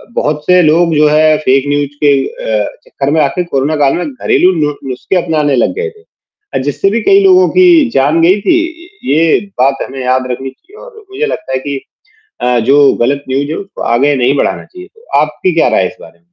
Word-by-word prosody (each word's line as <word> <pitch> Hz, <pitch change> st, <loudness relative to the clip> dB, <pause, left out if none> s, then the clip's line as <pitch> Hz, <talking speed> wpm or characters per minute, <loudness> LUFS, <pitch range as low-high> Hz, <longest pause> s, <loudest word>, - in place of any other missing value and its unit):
बहुत 150 Hz, 0 st, -1 dB
से 180 Hz, 0 st, +4 dB
लोग 165 Hz, +1 st, +2 dB
जो 150 Hz, 0 st, +4 dB
है 155 Hz, 0 st, +3 dB
फेक 135 Hz, -2 st, +1 dB
न्यूज़ 145 Hz, -1 st, 0 dB
के 145 Hz, -, +5 dB
अ, 105 Hz, -2 st, -3 dB, 0.2 s
चक्कर 140 Hz, +1 st, -3 dB
में 155 Hz, 0 st, +2 dB
आके 165 Hz, +5 st, 0 dB
कोरोना 150 Hz, -1 st, -1 dB
काल 140 Hz, -2 st, +2 dB
में 180 Hz, -, -3 dB
घरेलू 250 Hz, -8 st, +1 dB
नु 150 Hz, 0 st, +1 dB, 0.2 s
नुस्खे 130 Hz, +9 st, -3 dB
अपनाने 150 Hz, -4 st, 0 dB
लग -, -, +1 dB
गए 455 Hz, 0 st, -3 dB
थे। 430 Hz, 0 st, -21 dB, 0.6 s
जिससे 145 Hz, +7 st, 0 dB
भी 230 Hz, -, 0 dB
कई 395 Hz, -, +4 dB
लोगों 370 Hz, -1 st, +5 dB
की 345 Hz, -7 st, +4 dB
जान 150 Hz, +5 st, +1 dB
गयी 185 Hz, +5 st, +3 dB
थी, 340 Hz, -, +2 dB, 0.5 s
ये 160 Hz, +3 st, +2 dB, 0.2 s
बात 135 Hz, +1 st, +2 dB
हमें 135 Hz, 0 st, -8 dB
याद 130 Hz, 0 st, 0 dB
रखनी 135 Hz, +2 st, -5 dB
चाहिए 380 Hz, -, -20 dB
और 475 Hz, -3 st, -15 dB
मुझे 430 Hz, +4 st, -2 dB
लगता 215 Hz, -, -5 dB
है -, -, +1 dB
कि 140 Hz, 0 st, -5 dB, 0.6 s
अ, 125 Hz, -1 st, +1 dB
जो 140 Hz, 0 st, +5 dB
गलत 140 Hz, +3 st, -1 dB
न्यूज़ 140 Hz, +2 st, -1 dB
है -, -, -3 dB
उसको 195 Hz, -1 st, -8 dB
आगे 140 Hz, +4 st, +2 dB
नहीं 130 Hz, +2 st, +1 dB
बढ़ाना -, -, -1 dB
चाहिए। 365 Hz, -1 st, -13 dB
तो 455 Hz, +2 st, -23 dB
आपकी 155 Hz, +4 st, -1 dB
क्या 165 Hz, -, +2 dB
राय -, -, +2 dB
है 90 Hz, -, 0 dB
इस 110 Hz, -, -14 dB
बारे 80 Hz, -, -13 dB
में? 85 Hz, -, -30 dB
150 Hz, 215 wpm, -12 LUFS, 135-195 Hz, 0.6 s, के